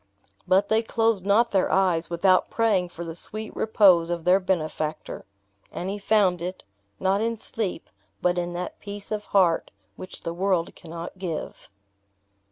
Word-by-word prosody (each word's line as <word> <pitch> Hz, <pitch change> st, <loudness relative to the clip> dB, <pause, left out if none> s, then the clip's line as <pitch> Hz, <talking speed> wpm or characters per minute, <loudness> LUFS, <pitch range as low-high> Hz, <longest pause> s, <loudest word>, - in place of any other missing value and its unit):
But 195 Hz, +2 st, +4 dB
they 220 Hz, +1 st, +3 dB
closed 225 Hz, -4 st, 0 dB
not 230 Hz, +4 st, +4 dB
their 190 Hz, -2 st, +2 dB
eyes 180 Hz, -4 st, +2 dB
without 185 Hz, +2 st, +3 dB
praying 205 Hz, -6 st, +1 dB
for 170 Hz, 0 st, -8 dB
the 165 Hz, -, -5 dB
sweet 215 Hz, +6 st, -6 dB
repose 185 Hz, -6 st, +4 dB
of 170 Hz, -1 st, -2 dB
their 180 Hz, +3 st, +5 dB
benefactor. 155 Hz, -4 st, -3 dB, 0.5 s
And 185 Hz, +2 st, -4 dB
he 205 Hz, -, -5 dB
found 200 Hz, -4 st, +2 dB
it; 180 Hz, +2 st, -5 dB, 0.4 s
not 195 Hz, +2 st, +1 dB
in 230 Hz, 0 st, -1 dB
sleep, 210 Hz, -5 st, -4 dB, 0.3 s
but 180 Hz, 0 st, +1 dB
in 175 Hz, 0 st, -3 dB
that 180 Hz, +1 st, -5 dB
peace 205 Hz, 0 st, -8 dB
of 210 Hz, -1 st, -3 dB
heart 180 Hz, -4 st, +2 dB, 0.3 s
which 185 Hz, -, -9 dB
the 165 Hz, -, -4 dB
world 180 Hz, -1 st, 0 dB
cannot 170 Hz, +2 st, -9 dB
give. 175 Hz, -4 st, -5 dB
185 Hz, 160 wpm, -25 LUFS, 175-205 Hz, 0.5 s, their